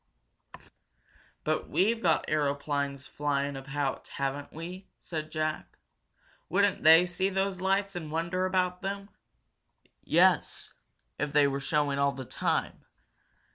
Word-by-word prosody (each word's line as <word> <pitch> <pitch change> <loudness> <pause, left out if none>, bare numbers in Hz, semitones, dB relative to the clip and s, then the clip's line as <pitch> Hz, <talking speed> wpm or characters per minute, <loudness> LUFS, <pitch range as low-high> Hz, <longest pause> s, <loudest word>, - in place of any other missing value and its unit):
"But - - -1
we've 225 +4 +2
got 165 -3 +2
aeroplanes 140 -1 -1
flying 145 -1 -1
about, 135 +1 -3
haven't 140 +1 -3
we?" 180 +4 -8
said 155 -2 -5
Jack. 155 -1 -3 0.7
"Wouldn't 200 +2 +2
they 160 +3 +8
see 185 +2 -1
those 190 -1 -1
lights 195 +1 +1
and 160 -4 -5
wonder 170 +3 0
about 180 -1 0
them?" 200 +1 -4 0.9
"Yes, 175 -1 +2 0.5
if 145 - -2
they 145 0 +6
were 140 0 -1
showing 145 -1 0
all 140 0 +2
the 130 0 -7
time. - - -2
160 Hz, 120 wpm, -29 LUFS, 140-185 Hz, 0.9 s, they